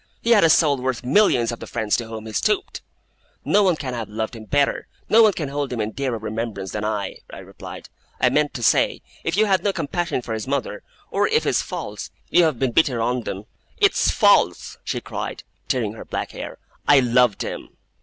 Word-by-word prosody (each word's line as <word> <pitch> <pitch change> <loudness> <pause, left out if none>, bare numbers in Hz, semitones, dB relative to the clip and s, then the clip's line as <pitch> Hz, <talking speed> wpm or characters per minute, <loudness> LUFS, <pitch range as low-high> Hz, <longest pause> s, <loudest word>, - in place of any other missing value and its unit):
He 235 - 0
had 210 -5 +6
a 165 - +6
soul 150 -3 +4
worth 130 -1 -2
millions 125 - +3
of 120 - -6
the - - -8
friends 110 -3 0
to 115 - -4
whom 110 -1 -7
he 110 - -8
stooped!' 210 - 0 0.6
'No 210 - +4
one 185 -4 +3
can 135 -5 -5
have 115 -3 -5
loved 110 +2 -4
him 110 -1 -10
better, 145 +3 +1 0.2
no 225 - +7
one 215 -2 +6
can 155 -5 -3
hold 140 -2 -3
him 120 - -3
in 105 0 -1
dearer 130 -1 -2
remembrance 110 -2 -4
than 105 - -4
I,' 105 -3 -3
I - - -9
replied. - - -10 0.3
'I - - +4
meant 150 -1 +1
to 120 - -4
say, - - +2 0.2
if 165 +3 -1
you 215 - +5
have 195 -3 +2
no 205 - +1
compassion 170 -5 -2
for 115 - -4
his 110 +2 -4
mother; 135 -6 -2 0.3
or - - +2
if - - +2
his - - +1
faults 105 0 -6 0.2
you 175 0 +5
have 155 -6 0
been 130 0 0
bitter 125 -2 +2
on 120 +1 -1
them 95 +1 -5 0.2
' - - -37
'It's - - +3
false,' - - +3
she - - -3
cried, - - -6 0.2
tearing 115 -5 -1
her 115 - -9
black - - -4
hair; - - -7 0.3
'I 145 -2 +7
loved 125 -3 +3
him! - - -7
125 Hz, 220 wpm, -22 LUFS, 110-150 Hz, 0.6 s, no